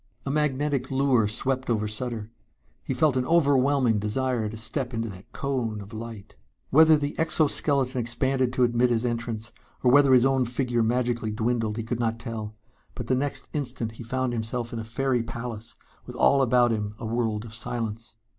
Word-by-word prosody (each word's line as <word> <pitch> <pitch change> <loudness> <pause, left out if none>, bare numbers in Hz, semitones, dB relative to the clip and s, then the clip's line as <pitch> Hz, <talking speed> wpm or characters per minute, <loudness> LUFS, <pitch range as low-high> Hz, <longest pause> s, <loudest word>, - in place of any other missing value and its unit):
A 135 - -1
magnetic 145 -2 0
lure 130 -5 +3
swept 130 +4 -1
over 110 -2 +1
Sutter. 110 0 -4 0.5
He 135 - -3
felt 145 +1 +3
an 125 - 0
overwhelming 140 -7 +3
desire 110 +1 -1
to 110 - -7
step 125 +2 -3
into 115 0 -2
that 95 -1 -12
cone 125 -6 -2
of 100 +2 -10
light.... 110 -2 -8 0.4
Whether 160 +2 +7
the 145 0 -2
exoskeleton 145 -5 +1
expanded 130 +2 0
to 125 - +2
admit 120 +1 +3
his 120 0 +1
entrance 115 -2 -3 0.3
or 125 - +5
whether 140 0 +6
his 125 0 +5
own 135 -1 +2
figure 120 0 -1
magically 120 0 0
dwindled 110 0 -1
he 115 - -2
could 115 +1 -3
not 115 -1 0
tell, 115 -2 -6 0.4
but - - -5
the 130 - +1
next 140 +2 -2
instant 125 -6 -2
he 115 - -10
found 130 +1 -1
himself 115 +1 -3
in 115 - -3
a - - -4
fairy 125 +2 0
palace 115 -1 -7 0.3
with - - -8
all 140 0 +4
about 125 -1 +4
him 105 -1 -2
a 115 - -7
world 110 -1 -1
of 110 - -10
silence. 115 -1 -5
120 Hz, 185 wpm, -26 LUFS, 115-130 Hz, 0.5 s, Whether